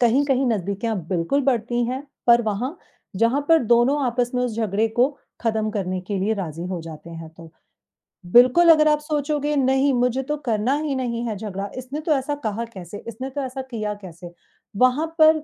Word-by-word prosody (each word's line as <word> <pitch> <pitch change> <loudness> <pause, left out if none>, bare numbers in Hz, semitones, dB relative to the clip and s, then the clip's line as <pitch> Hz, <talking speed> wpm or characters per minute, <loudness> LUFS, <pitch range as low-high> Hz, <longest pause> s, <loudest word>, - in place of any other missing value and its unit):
कहीं-कहीं 265 +2 +3
नज़दीकियाँ 210 +1 -1
बिल्कुल 185 +10 0
बढ़ती 240 -2 0
हैं, 260 +3 -3 0.2
पर 235 0 +6
वहाँ 225 - -2 0.4
जहाँ 230 +7 +2
पर 325 0 +7
दोनों 240 +6 +3
आपस 245 0 0
में 250 - +1
उस 235 -3 -2
झगड़े 220 0 +1
को 240 +4 +2 0.3
खत्म 220 -2 0
करने 185 -3 -2
के 195 +2 -4
लिए 210 +4 0
राज़ी 170 -4 -5
हो 180 -2 -4
जाते 165 +1 -10
हैं 165 -1 -8
तो। 165 -1 -12 0.8
बिल्कुल 255 +8 +7
अगर 305 -1 +5
आप 300 0 +3
सोचोगे, 295 0 -1
नहीं, 265 0 +2
मुझे 250 +1 +1
तो 295 +3 -3
करना 225 +3 +1
ही 290 -3 -2
नहीं 240 -2 -2
है 215 - -2
झगड़ा, 200 -1 -5
इसने 260 +4 -5
तो 315 - -2
ऐसा 285 +1 -1
कहा 220 +2 -2
कैसे, 185 +1 -8
इसने 255 +4 -6
तो 285 +2 -4
ऐसा 265 0 -4
किया 215 -2 -2
कैसे, 175 -1 -10 0.5
वहाँ 255 +6 +3
पर 315 -1 +6
240 Hz, 185 wpm, -22 LUFS, 210-270 Hz, 0.8 s, पर